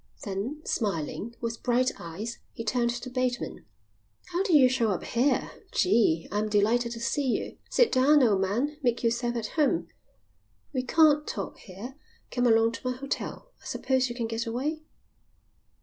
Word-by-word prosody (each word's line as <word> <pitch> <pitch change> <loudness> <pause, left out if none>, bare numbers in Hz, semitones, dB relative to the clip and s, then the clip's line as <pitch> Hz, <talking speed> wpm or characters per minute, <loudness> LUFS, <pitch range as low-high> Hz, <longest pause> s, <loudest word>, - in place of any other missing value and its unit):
Then, 215 +10 -4
smiling, 205 - -2
with 230 -1 -3
bright 250 +1 +2
eyes, 200 +8 -6
he 230 - -6
turned 235 +1 +1
to 240 +1 -4
Bateman. 250 -1 -2 0.6
"How 350 +1 0
did 385 -5 +3
you 265 -3 +8
show 250 -3 +1
up 190 - -1
here? 255 +2 +1 0.2
Gee, 185 -5 +3
I 205 - 0
am 215 0 -1
delighted 230 +3 +2
to 230 - -7
see 270 +4 0
you. 250 - -2
Sit 485 -2 +3
down, 280 +3 +5
old 205 -5 +3
man. 245 +11 0
Make 240 -3 0
yourself 240 +1 0
at 225 -2 -2
home." 310 +3 +2 0.8
"We 260 - 0
can't 300 +2 +4
talk - - -5
here. 225 +8 -9 0.3
Come 245 -1 +2
along 225 0 +4
to 255 +2 -4
my 250 - -3
hotel. 275 - -5
I - - -19
suppose 260 -1 +1
you 240 - -5
can 240 -2 -2
get 225 +1 -3
away?" 285 +7 -2
240 Hz, 170 wpm, -28 LUFS, 225-265 Hz, 0.8 s, you